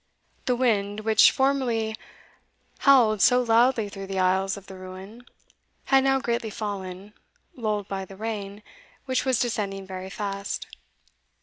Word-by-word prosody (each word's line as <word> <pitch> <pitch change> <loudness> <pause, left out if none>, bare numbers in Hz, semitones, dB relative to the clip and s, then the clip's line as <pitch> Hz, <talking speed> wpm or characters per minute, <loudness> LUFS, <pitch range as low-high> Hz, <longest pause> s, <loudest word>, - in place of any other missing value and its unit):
The 250 - +2
wind, 210 -4 0
which 220 0 +6
formerly 245 -5 0 0.8
howled 235 -7 +5
so 250 +4 +6
loudly 230 -1 +3
through 195 -1 -8
the 195 0 -4
aisles 190 +1 +1
of 200 - -12
the 195 - -11
ruin, 190 +6 -11 0.6
had 270 -1 +4
now 270 0 +3
greatly 235 -3 -2
fallen, 200 -2 -6 0.4
lulled 210 -5 -2
by 195 -1 -4
the 195 0 -13
rain, 210 -1 -5 0.4
which 260 0 0
was 260 -3 +2
descending 200 -5 -2
very 190 0 -7
fast. 200 0 -4
210 Hz, 135 wpm, -25 LUFS, 195-240 Hz, 0.8 s, which